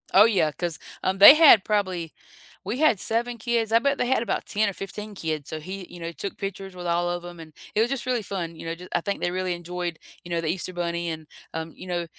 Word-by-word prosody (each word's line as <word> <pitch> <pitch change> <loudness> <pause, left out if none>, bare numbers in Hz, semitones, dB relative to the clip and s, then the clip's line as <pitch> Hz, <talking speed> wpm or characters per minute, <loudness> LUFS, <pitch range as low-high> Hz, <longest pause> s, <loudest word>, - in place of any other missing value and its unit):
Oh 200 +3 +8
yeah, 195 -9 +2
'cause, 165 -1 -4 0.2
um, 190 +1 0
they 205 +9 +12
had 300 -11 +8
probably 185 -6 -1 0.5
we 210 +6 -3
had 300 -9 +3
7 235 +3 -1
kids, 230 -1 0
I 230 - +6
bet 280 +3 +1
they - - 0
had 260 -1 +2
about 230 - -2
10 210 0 +1
or - - -5
15 210 +2 -7
kids, 155 -5 -4
so 155 - -4
he, 185 +3 -7
you 175 - -10
know, 165 0 -5
took 195 +3 -6
pictures 195 -1 -6
with 180 -1 -7
all 175 0 +1
of 175 0 -3
'em, 175 -1 -9
and 160 -1 -11 0.2
it 215 - +2
was 230 - +2
just 275 -2 -3
really 250 -2 0
fun, 180 -5 -4
you 165 - -9
know, 165 - -3
ju 180 +2 -11
I - - +1
think 200 -1 -3
they 175 - -1
really 185 -1 -1
enjoyed, 175 -1 -5 0.3
you 175 - -11
know, 170 -1 -1
the 165 - -3
Easter 180 +3 -2
Bunny, 170 -1 -2
and, 160 -1 -6 0.3
um, 160 0 -5
you - - -11
know, 175 -1 -2
185 Hz, 260 wpm, -25 LUFS, 170-215 Hz, 0.5 s, they